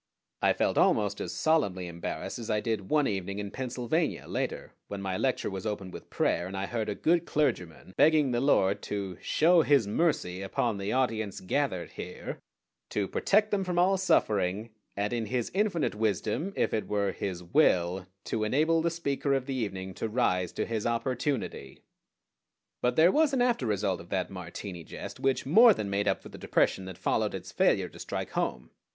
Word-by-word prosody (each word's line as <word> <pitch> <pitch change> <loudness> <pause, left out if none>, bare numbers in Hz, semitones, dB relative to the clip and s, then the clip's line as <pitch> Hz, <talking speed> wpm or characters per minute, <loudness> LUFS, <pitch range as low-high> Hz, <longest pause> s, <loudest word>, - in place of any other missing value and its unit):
I - - +4
felt - - +1
almost 100 -2 +2
as - - -4
solemnly 100 - +1
embarrassed 85 +6 -5
as 115 - -6
I 105 -1 +2
did 105 -3 -3
one 150 -2 +3
evening 100 -2 -2
in 100 -1 -4
Pennsylvania, 130 +6 -2
later, - - -3
when 100 - -5
my 95 -1 -3
lecture 130 -1 0
was 95 +3 -4
opened 100 -3 -4
with - - -10
prayer 85 - 0
and 95 +1 -6
I 95 - -1
heard 110 0 -3
a 105 - -2
good 170 +6 +2
clergyman 95 - -1
begging 150 -3 +4
the 120 0 0
Lord 100 -7 +3
to 95 -3 -4
"show 170 +2 +4
His 140 -7 +4
mercy 100 - 0
upon 100 +2 -1
the 100 +1 -2
audience 110 -6 0
gathered 95 -3 -1
here," - - -7 0.5
to 100 -2 -1
"protect 210 - +2
them 200 -2 +1
from 180 -2 -2
all 185 +2 +4
suffering, 105 - +1 0.3
and 105 +3 -1
in 115 -2 -2
His 120 +1 -2
infinite 195 -4 +1
wisdom, 110 - -1
if - - 0
it 110 - -1
were 100 -1 0
His 90 -3 -4
will, 90 - +2 0.2
to 110 - -2
enable 155 +9 +2
the 170 - +1
speaker 140 -4 -1
of 135 -2 -1
the 135 - -3
evening 95 -6 -3
to 110 - -3
rise 90 -7 +1
to - - -2
his 115 -1 -2
opportunity." 120 - -2 1.0
But 125 - +1
there 165 +3 +6
was 305 +1 +3
an 260 - +2
after 235 - +1
result 100 -3 0
of 85 - -14
that 95 -1 -1
Martini 90 0 -7
jest - - -8
which 135 -1 0
more 220 - +7
than 100 -2 -3
made 100 +1 0
up - - 0
for - - -10
the - - -11
depression 95 - +1
that 95 -2 -8
followed - - 0
its - - -7
failure - - +2
to - - -14
strike - - -4
home. 60 -1 -2
110 Hz, 190 wpm, -29 LUFS, 95-145 Hz, 1.0 s, more